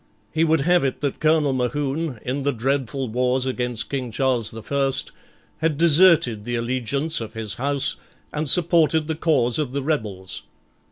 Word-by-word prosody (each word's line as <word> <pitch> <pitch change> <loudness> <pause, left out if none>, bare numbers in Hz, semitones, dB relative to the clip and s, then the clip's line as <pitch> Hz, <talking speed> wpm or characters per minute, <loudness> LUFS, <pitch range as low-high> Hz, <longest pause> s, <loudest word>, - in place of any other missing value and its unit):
He 160 +1 +2
would 160 -2 +2
have 175 +2 +3
it 135 -2 -2
that 140 -2 -2
Colonel 155 -3 +2
Mohune, 135 +3 -2
in 130 +3 -3
the 140 +1 +1
dreadful 135 +1 -2
wars 125 +3 0
against 125 -3 -2
King 130 -3 -3
Charles 125 -2 0
the 110 -1 -9
First, 135 -1 -1 0.5
had 160 -2 0
deserted 160 - +4
the 120 +2 -3
allegiance 130 +6 -1
of 110 0 -8
his 110 -3 0
house 140 +4 0 0.4
and 150 -1 0
supported 160 -2 +4
the 160 - -1
cause 150 -6 +1
of 140 -4 -2
the 140 -1 -2
rebels. 105 -11 -3
135 Hz, 165 wpm, -22 LUFS, 125-155 Hz, 0.5 s, deserted